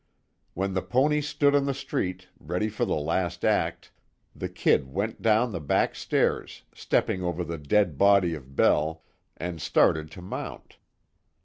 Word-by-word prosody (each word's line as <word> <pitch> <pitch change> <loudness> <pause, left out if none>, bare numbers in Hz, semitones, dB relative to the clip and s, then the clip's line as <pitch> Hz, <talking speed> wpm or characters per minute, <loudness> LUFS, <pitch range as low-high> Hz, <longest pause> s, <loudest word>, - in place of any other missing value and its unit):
When 95 +2 -1
the 95 - 0
pony 135 +11 +2
stood 145 -1 +2
on 140 -1 +3
the 140 -1 -1
street, 95 -8 -3
ready 105 +5 -2
for 105 - -1
the - - 0
last 85 +4 -1
act, - - 0 0.4
the - - -4
"Kid" - - +2
went 105 +8 -3
down 115 +2 +3
the 90 - -4
back 70 - +1
stairs, - - -1
stepping 95 - 0
over 90 0 -2
the 85 -1 -5
dead 80 0 +1
body 100 -4 +5
of 70 -3 -10
Bell, 80 +3 +2 0.3
and 85 -2 -5
started 75 +2 +2
to 90 - -10
mount. 90 - -7
90 Hz, 155 wpm, -26 LUFS, 80-110 Hz, 0.4 s, body